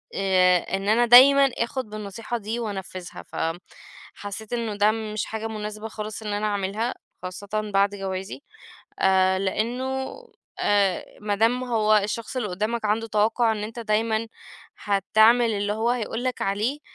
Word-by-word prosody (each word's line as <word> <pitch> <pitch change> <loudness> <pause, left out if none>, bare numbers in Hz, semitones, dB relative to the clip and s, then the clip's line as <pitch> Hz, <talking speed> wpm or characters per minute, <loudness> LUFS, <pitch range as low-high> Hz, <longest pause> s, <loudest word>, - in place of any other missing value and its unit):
آآ 185 -2 +4 0.2
إن 195 +1 -4
أنا 235 +3 +4
دايمًا 270 +3 +8
آخُد 235 0 -2
بالنصيحة 215 +3 -5
دي 225 +2 -4
وأنفّذها، 190 -5 -6
ف - - -15 0.8
حسّيت 205 +3 -7
إنه 230 -3 -2
ده 205 +1 +4
م 220 -1 -5
مش 215 - -2
حاجة 220 0 -4
مناسبة 215 0 -6
خالص 215 0 -7
إن 210 - -3
أنا 205 +1 -1
أعملها 205 +4 -1 0.3
خاصةً 205 +3 -4
بعد 200 +1 +3
جوازي، 190 +3 -5 0.6
آآ 190 0 +3
لإنه 250 +7 -2 0.5
آآ 200 -3 +2 0.2
ما 205 -1 -1
دام 230 +4 +2
هو 220 -3 +2
الشخص 215 +4 -3
اللي 235 - -1
قدّامك 215 +5 -2
عنده 220 +2 0
توقُّع 220 +2 +2
إن 210 -1 -4
أنت 225 +3 -6
دايمًا 220 0 0 0.5
هتعمل 220 +4 +3
اللي 205 0 -1
هو 225 +2 0
هيقول 240 0 -3
لك 255 - -2
عليه 215 +9 -1
215 Hz, 150 wpm, -24 LUFS, 200-230 Hz, 0.8 s, دايمًا